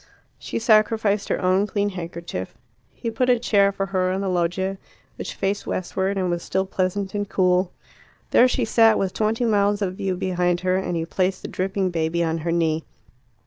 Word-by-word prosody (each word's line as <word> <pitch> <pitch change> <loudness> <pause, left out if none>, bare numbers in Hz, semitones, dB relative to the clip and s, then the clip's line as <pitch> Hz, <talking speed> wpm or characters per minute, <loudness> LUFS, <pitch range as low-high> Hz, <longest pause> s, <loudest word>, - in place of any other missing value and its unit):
She - - -5
sacrificed 215 -2 +2
her - - 0
own 185 +3 +2
clean 205 0 0
handkerchief. 170 - -6 0.4
He 230 - -5
put 250 +3 0
a 245 - +5
chair 200 -4 +3
for 195 0 -2
her 185 -1 +1
on 190 +1 -1
the 195 - -1
loggia, 185 +2 -1 0.4
which - - -6
faced 200 +1 -2
westward, 190 +2 -2
and 185 -1 0
was 175 0 -2
still 190 +2 -1
pleasant 190 +1 -2
and 205 -1 -2
cool. 180 -1 +2 0.6
There 250 - +6
she 250 -1 0
sat, 225 0 +5
with 190 -1 -1
twenty 220 +3 0
miles 205 -2 +2
of 185 -1 -3
view 190 -1 -1
behind 180 -2 0
her, 185 0 +1
and 190 -2 -1
he 165 -1 -1
placed 185 +2 -1
the - - -4
dripping 190 0 -1
baby 165 0 0
on 165 0 -1
her 165 +2 -2
knee. 160 -2 +1
190 Hz, 190 wpm, -23 LUFS, 180-205 Hz, 0.6 s, There